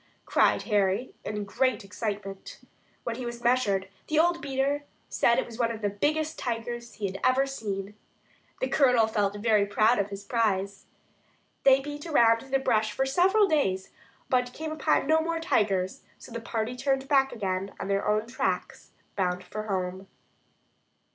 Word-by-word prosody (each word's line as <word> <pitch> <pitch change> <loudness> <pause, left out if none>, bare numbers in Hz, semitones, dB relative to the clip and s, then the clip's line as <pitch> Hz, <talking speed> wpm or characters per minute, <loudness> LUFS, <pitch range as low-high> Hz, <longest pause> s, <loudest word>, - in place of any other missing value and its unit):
cried - - +3
Harry, 205 +2 +1
in 210 0 -3
great 255 +2 0
excitement. 195 -1 -5 0.5
When 235 -1 -3
he 255 - -5
was 240 0 -6
measured, 210 -6 +2 0.2
the 310 - 0
old 340 +2 +3
beater 280 +1 -1 0.3
said 235 - +3
that - - +2
it - - -6
was 235 0 -11
one 235 -1 +2
of 225 -2 -6
the 205 - +1
biggest 310 +9 -1
tigers 235 0 -4
he 210 - -4
had 195 0 -4
ever 260 +2 +4
seen. 205 -7 -5 0.7
The 260 - +1
Colonel 250 -4 +4
felt 205 -2 0
very 210 -1 +2
proud 215 +3 +3
of 200 0 0
his 200 0 -7
prize. 200 -3 -1 0.8
They 270 0 +6
beat 295 +3 -7
around 230 -7 +5
through 270 - -13
the 270 - +3
bush 220 -5 +1
for 265 +6 0
several 380 +9 +4
days, 195 - 0 0.4
but 250 -1 +2
they - - -12
came 315 0 -5
upon 310 -3 +1
no 315 +2 +3
more 330 0 -1
tigers; 200 - 0 0.2
so - - -13
the 230 0 -5
party 230 +1 -3
turned 270 +1 0
back 270 -2 +3
again 195 -3 -3
on - - -4
their 200 0 0
own 215 +1 +2
tracks 235 - -3 0.2
bound 180 -2 -1
for 215 0 -6
home. 190 -1 -3
230 Hz, 175 wpm, -27 LUFS, 200-270 Hz, 0.8 s, They